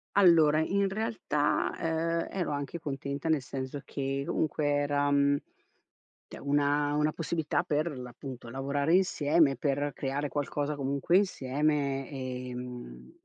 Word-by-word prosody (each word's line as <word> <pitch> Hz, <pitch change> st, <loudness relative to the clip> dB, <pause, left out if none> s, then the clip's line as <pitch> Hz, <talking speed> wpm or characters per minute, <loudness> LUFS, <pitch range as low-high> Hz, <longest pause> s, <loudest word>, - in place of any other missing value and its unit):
Allora, 165 Hz, -6 st, +6 dB
in 195 Hz, +4 st, +1 dB
realtà, 210 Hz, -8 st, 0 dB
ehm, 165 Hz, +1 st, 0 dB
ero 175 Hz, -5 st, -1 dB
anche 145 Hz, +3 st, -3 dB
contenta. 140 Hz, 0 st, -4 dB
Nel 155 Hz, -4 st, +3 dB
senso 130 Hz, +2 st, -5 dB
che 135 Hz, 0 st, -2 dB
comunque 155 Hz, -1 st, 0 dB
era, 145 Hz, 0 st, +1 dB
mhmm, 140 Hz, 0 st, +3 dB, 0.9 s
cioè, -, -, -10 dB
una 145 Hz, +1 st, +1 dB
una 150 Hz, +1 st, +2 dB
possibilità 160 Hz, -1 st, -1 dB
per 150 Hz, +2 st, 0 dB
l'appunto, 125 Hz, 0 st, -8 dB
lavorare 140 Hz, +4 st, 0 dB
insieme, 150 Hz, -5 st, +3 dB
per 145 Hz, 0 st, 0 dB
creare 140 Hz, +2 st, -2 dB
qualcosa 145 Hz, +1 st, -2 dB
comunque 140 Hz, +5 st, +2 dB
insieme, 140 Hz, -5 st, 0 dB
ehm, 125 Hz, -, -6 dB
145 Hz, 120 wpm, -30 LUFS, 135-155 Hz, 0.9 s, Allora